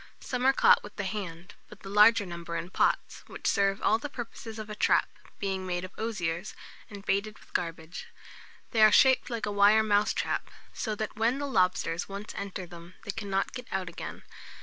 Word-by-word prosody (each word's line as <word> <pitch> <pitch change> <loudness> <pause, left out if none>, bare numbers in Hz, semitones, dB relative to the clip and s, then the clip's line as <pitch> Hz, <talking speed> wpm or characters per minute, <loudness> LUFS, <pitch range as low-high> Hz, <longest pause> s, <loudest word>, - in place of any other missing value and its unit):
Some 250 0 -1
are - - +8
caught - - +5
with 205 - -11
the 200 - -3
hand, 190 -2 -5 0.2
but 210 - -14
the - - -10
larger 210 +1 +6
number 170 -1 -6
in 175 +2 -5
pots, - - 0
which - - -10
serve 195 0 +2
all 220 - +3
the 290 - -5
purposes 230 -3 -7
of 215 -1 -6
a 210 - -6
trap, 210 - +3 0.3
being 190 -2 -3
made 180 0 -2
of 185 - -11
osiers, 190 -4 -3 0.3
and 200 -1 -10
baited 210 +2 0
with - - -21
garbage. 165 0 -4 0.6
They 225 - +2
are 215 0 +8
shaped 260 +4 +5
like 230 -2 -2
a 205 - -2
wire 205 +2 +5
mousetrap; 210 -1 +1 0.2
so 215 -2 -3
that 215 +1 -5
when 230 +4 +2
the 285 - -3
lobsters 185 -8 +1
once 200 +2 -7
enter 195 -2 -5
them, 170 +1 -12
they 205 - -3
cannot 195 -2 -2
get 250 -1 -7
out 190 -2 -2
again. - - -8
205 Hz, 195 wpm, -29 LUFS, 185-220 Hz, 0.6 s, are